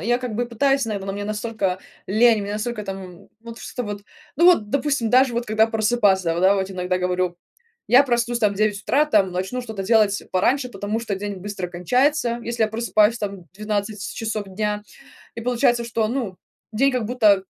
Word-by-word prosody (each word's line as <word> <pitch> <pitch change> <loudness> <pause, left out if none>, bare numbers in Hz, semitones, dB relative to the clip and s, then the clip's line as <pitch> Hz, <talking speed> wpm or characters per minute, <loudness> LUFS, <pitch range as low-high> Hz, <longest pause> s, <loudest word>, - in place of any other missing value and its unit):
Я 240 +3 +1
как 250 -3 -5
бы 240 +3 -1
пытаюсь, 270 +2 +1
наверно, 200 -3 -4
но 195 - -2
мне 205 0 -4
настолько 210 -3 -2 0.3
лень, 220 +1 +4
настолько 215 +2 -3
там, 195 -1 -5
м, 185 0 -12
вот 230 0 -10
что 245 - -5
вот. 205 -2 -6 0.3
Ну 340 +4 +5
вот, 220 -13 +4
допустим, 280 -4 0
даже 255 0 +4
вот 235 +1 -1
когда 220 0 +3
просыпаться, 210 -6 +2
да, 190 +2 +5
вот 190 -1 -2
иногда 185 -1 -1
говорю: 180 -1 -1 0.5
"Я 250 +3 +7
проснусь 240 -2 0
там 210 -3 +2
в - - -10
9 210 -1 +1
утра, 290 +7 +3
там, 205 -11 +2
начну 190 +8 -3
что-то 220 -5 -6
делать 210 0 +3
пораньше, 250 +8 +1
потому 205 +1 -3
что 230 -3 -3
день 200 +1 -5
быстро 190 -1 -5
кончается, 245 - +1
если 235 -1 -2
я 220 - +3
просыпаюсь 220 0 +2
там 200 -3 -5
12 210 +1 -3
часов 220 -2 -3
дня", 210 +2 -2 0.5
и 230 - -6
получается, 240 0 +1
что 225 -1 -1
ну 230 -6 -3 0.4
день 270 +6 +2
как 245 -4 -1
будто 215 -5 +3
215 Hz, 190 wpm, -22 LUFS, 200-240 Hz, 0.5 s, Я